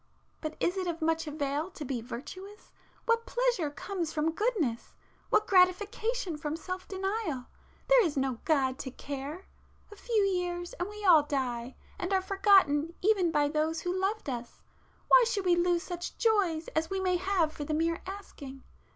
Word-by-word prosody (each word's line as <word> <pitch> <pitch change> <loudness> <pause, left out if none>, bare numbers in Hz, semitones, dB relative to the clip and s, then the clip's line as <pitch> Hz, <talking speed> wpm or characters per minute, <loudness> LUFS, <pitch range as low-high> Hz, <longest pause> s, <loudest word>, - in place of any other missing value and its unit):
But 310 -1 -5
is 360 +3 0
it 370 -1 -1
of 335 -1 -2
much 325 0 0
avail 295 +2 -2
to 315 -5 -8
be 250 -3 -3
virtuous? 370 - -9 0.3
What 460 0 +1
pleasure 485 -11 +1
comes 340 +2 -4
from 315 +1 0
goodness?—what 415 - -1
gratification 395 +1 +2
from 300 0 -3
self 370 +2 -6
denial? 385 - -2 0.4
There - - +6
is 315 -6 -1
no 265 -3 0
God 270 -5 +1
to 265 - -4
care! 280 +7 -6 0.5
A - - -10
few 440 0 +1
years, 355 -2 -1
and 355 +3 -2
we 420 0 -7
all 335 -5 +8
die, 260 -4 -3 0.2
and 360 +2 -3
are 380 - +4
forgotten 375 -6 +4
even 390 -4 +3
by 295 -2 +2
those 310 +2 0
who 355 - -1
loved 390 +2 -1
us,—why 250 - 0
should 410 -5 -1
we 355 -1 +5
lose 345 0 +2
such 350 -1 -6
joys 380 -8 +2
as 320 +1 -1
we 385 0 -1
may 365 -1 +1
have 360 -4 +1
for 295 - -5
the 305 +1 -2
mere 330 +1 0
asking? 285 -9 -9
350 Hz, 170 wpm, -30 LUFS, 295-390 Hz, 0.5 s, all